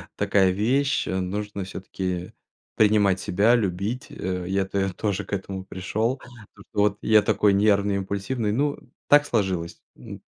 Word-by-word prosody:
такая 100 -2 +3
вещь, 130 +9 +1
нужно 100 +2 -3
всё-таки 95 -1 -5 0.4
принимать 105 -3 +3
себя, 105 +8 +3
любить, 105 +3 -2
э. 90 -1 -4
Я 95 +1 0
тэ 95 0 -1
тоже 100 +1 -2
к - - -8
этому 95 -1 -4
пришёл, 110 +7 -2 0.4
то, 100 - -15
что 105 - -4
вот 105 -1 +2
я 110 -1 +5
такой 105 -1 +2
нервный, 100 0 +3
импульсивный. 100 +4 -2
Ну, 140 +6 0 0.3
так 145 0 +6
сложилось, 95 - -2 0.2
н - - -10
100 Hz, 145 wpm, -24 LUFS, 95-110 Hz, 0.4 s, так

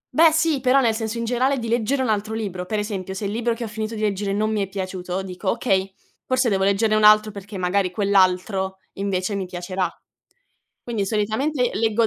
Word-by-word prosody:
Beh 325 0 +7
sì, 320 -3 +2
però 260 +1 +4
nel 230 -4 +3
senso 220 +1 -3
in 230 - -2
generale 255 +3 +1
di 230 -2 -4
leggere 240 +4 +1
un 235 - -1
altro 215 +1 -1
libro. 185 -5 -4
Per 215 - -1
esempio, 195 -3 -4
se 200 - -4
il 200 - -2
libro 235 +1 0
che 235 - -5
ho - - -3
finito 215 +1 -4
di 215 - -5
leggere 200 -1 -1
non 215 +2 0
mi 210 -2 0
è 195 - -1
piaciuto, 185 -1 -4
dico: 185 +1 -4
"Okay, 195 -5 +1 0.4
forse 255 -2 +2
devo 190 -1 +1
leggerne 205 +2 +2
un 215 - +2
altro 215 0 +6
perché 200 0 -8
magari 185 +1 +1
quell'altro 190 0 +1 0.2
invece 195 0 -2
mi 195 -2 -3
piacerà". 180 +1 -2 0.9
Quindi 220 -5 -2
solitamente 240 +6 0
leggo 225 +1 +2
210 Hz, 210 wpm, -22 LUFS, 190-230 Hz, 0.9 s, Beh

